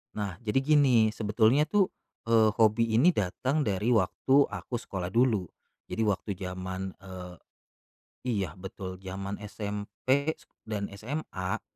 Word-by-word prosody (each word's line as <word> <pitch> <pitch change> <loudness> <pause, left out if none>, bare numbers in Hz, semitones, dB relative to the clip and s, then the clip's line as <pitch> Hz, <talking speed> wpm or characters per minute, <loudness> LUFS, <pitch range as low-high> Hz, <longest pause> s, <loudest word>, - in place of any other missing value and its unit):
Nah, 100 -4 -3
jadi 110 +4 +2
gini 135 -5 +5
sebetulnya 110 +6 +3
tuh, 190 +5 +3 0.4
eee, 110 -1 +5
hobi 115 +1 +4
ini 170 +6 +5
datang 130 - 0
dari 105 +1 0
waktu 130 +7 +4
aku 125 - -5
sekolah 95 -6 -4
dulu. 115 -3 +2 0.4
Jadi - - -3
waktu 100 -1 -1
jaman, 95 0 -5
eee 90 -1 -9 0.9
iya 100 -8 0
betul, 95 0 -7
jaman 95 +1 -5
SMP 105 +8 -1 0.3
dan 105 -2 -3
SMA, 100 -4 -4
105 Hz, 125 wpm, -29 LUFS, 95-125 Hz, 0.9 s, gini